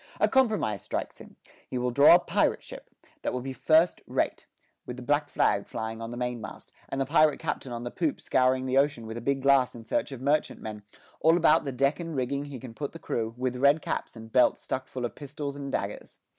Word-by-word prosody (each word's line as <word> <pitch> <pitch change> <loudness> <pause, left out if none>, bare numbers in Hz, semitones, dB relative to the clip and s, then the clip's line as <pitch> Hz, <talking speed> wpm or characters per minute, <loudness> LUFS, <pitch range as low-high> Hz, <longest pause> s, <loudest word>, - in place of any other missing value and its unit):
A - - +4
compromise 215 - +2
strikes - - -4
him; - - -14 0.3
he 130 - -3
will 125 0 0
draw 140 +6 +8
a - - +6
pirate - - 0
ship: - - -11 0.3
that - - -2
will 125 - -2
be 135 +1 -5
first 160 +5 +3
rate, - - -1 0.4
with 125 - -7
the 125 - -8
black 145 +2 +1
flag 100 -5 +1
flying 110 0 -5
on 115 - -5
the 120 - -6
mainmast, 125 -2 -5 0.2
and 135 - -3
the 135 - +1
pirate 155 +1 +4
captain 130 - -4
on 120 0 -5
the 120 - -5
poop 160 -4 -1
scouring 130 0 +2
the 130 +1 +3
ocean 140 -5 0
with 110 0 -6
a - - -5
big 135 +2 -1
glass 135 -3 +4
in 115 -1 -10
search - - -1
of 135 - -7
merchantmen; 130 -6 -1 0.4
all 165 +2 +5
about 160 -2 +4
the 135 - -2
deck 140 +5 +1
and 165 -2 -5
rigging 140 +2 -1
he 140 -3 -8
can 120 -1 -9
put 145 +4 -5
the - - -7
crew, 115 -7 -3
with 125 0 -2
red 140 +4 +4
caps, - - -3
and 110 0 -11
belts 125 -1 +4
stuck 130 0 -3
full 125 -2 -4
of 115 - -4
pistols 145 0 -6
and 140 -1 -6
daggers. - - -4
130 Hz, 230 wpm, -28 LUFS, 120-145 Hz, 0.4 s, draw